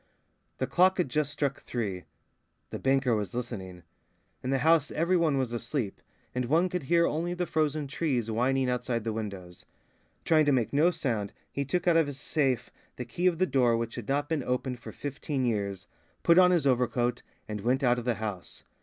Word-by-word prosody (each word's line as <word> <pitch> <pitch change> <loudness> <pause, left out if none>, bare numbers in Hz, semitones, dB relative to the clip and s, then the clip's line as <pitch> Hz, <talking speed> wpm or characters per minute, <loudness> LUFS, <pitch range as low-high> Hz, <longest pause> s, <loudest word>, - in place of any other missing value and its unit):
The - - 0
clock 185 +1 +3
had 180 -7 0
just 150 +1 0
struck 140 -2 -2
three. 100 -7 -4 0.7
The - - -4
banker 135 -3 +2
was 105 -1 -3
listening. 95 -8 -5 0.6
In 130 - -3
the 135 - +2
house 160 -3 +4
every 170 +4 +1
one 160 -5 +2
was 130 -3 -1
asleep, 115 -2 -3 0.3
and 125 0 -1
one 165 +8 +2
could 180 0 -2
hear 170 +4 +3
only 170 +3 -1
the 180 0 -1
frozen 155 -2 0
trees 135 -6 -1
whining 130 +3 +1
outside 125 -2 -1
the 110 0 -2
windows. 100 -5 -6 0.6
Trying 155 -2 +4
to 145 - +3
make 125 -3 +1
no 155 +5 +5
sound, 125 - -2 0.2
he 140 - -2
took 175 +6 -1
out 170 -1 +5
of 160 -3 +3
his 140 -1 -5
safe 135 -4 0 0.2
the - - -5
key 180 +1 0
of 175 -2 +2
the 185 - +3
door 125 -8 +3
which 115 0 -3
had - - -7
not 145 +1 0
been 160 -3 -1
opened 125 0 -2
for 115 -2 -9
fifteen 140 +1 -3
years, 100 -4 -2 0.4
put 170 +1 +6
on 180 -1 +7
his 175 -5 +2
overcoat, 125 -2 +1 0.3
and 105 -1 -4
went 130 +5 +1
out 125 -1 +3
of 120 - -7
the 120 -2 +1
house. 105 -5 -6
130 Hz, 200 wpm, -29 LUFS, 115-155 Hz, 0.7 s, on